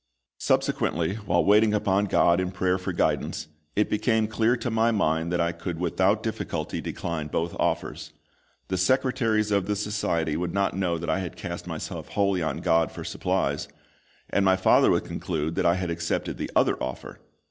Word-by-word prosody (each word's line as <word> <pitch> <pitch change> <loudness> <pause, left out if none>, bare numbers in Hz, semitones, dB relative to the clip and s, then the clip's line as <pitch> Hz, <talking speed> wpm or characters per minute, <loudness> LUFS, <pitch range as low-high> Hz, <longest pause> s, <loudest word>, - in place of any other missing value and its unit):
Subsequently, 85 +2 +1
while 90 -1 +2
waiting 105 +1 +5
upon 100 -1 +2
GOD 85 -3 +3
in 90 - -1
prayer 95 -1 0
for 90 - -3
guidance, - - -1 0.3
it 105 - +2
became 110 0 +1
clear 110 +2 +1
to 120 0 -3
my 110 +1 +3
mind 80 -6 +1
that 90 - 0
I 85 0 +2
could 85 0 -5
without 95 +5 +1
difficulty 110 - -3
decline 85 -3 -4
both 85 +2 -2
offers. - - -2 0.6
The 95 -1 -1
secretaries 115 -1 +2
of 100 -2 +1
the 105 - 0
Society 100 -7 -1
would 85 +2 -3
not 100 -2 +1
know 90 -3 0
that 80 0 -2
I 80 - +1
had 90 -4 -5
cast - - -6
myself - - -5
wholly 100 -3 +1
on 80 - -2
GOD 80 -2 +2
for - - -7
supplies, - - -1 0.6
and 100 - +1
my 95 -1 +5
father 95 - +4
would - - +2
conclude 80 -2 -3
that - - +1
I 85 - +4
had 90 -2 -2
accepted 85 0 -2
the - - -3
other - - +2
offer. - - -5
95 Hz, 180 wpm, -26 LUFS, 85-105 Hz, 0.6 s, waiting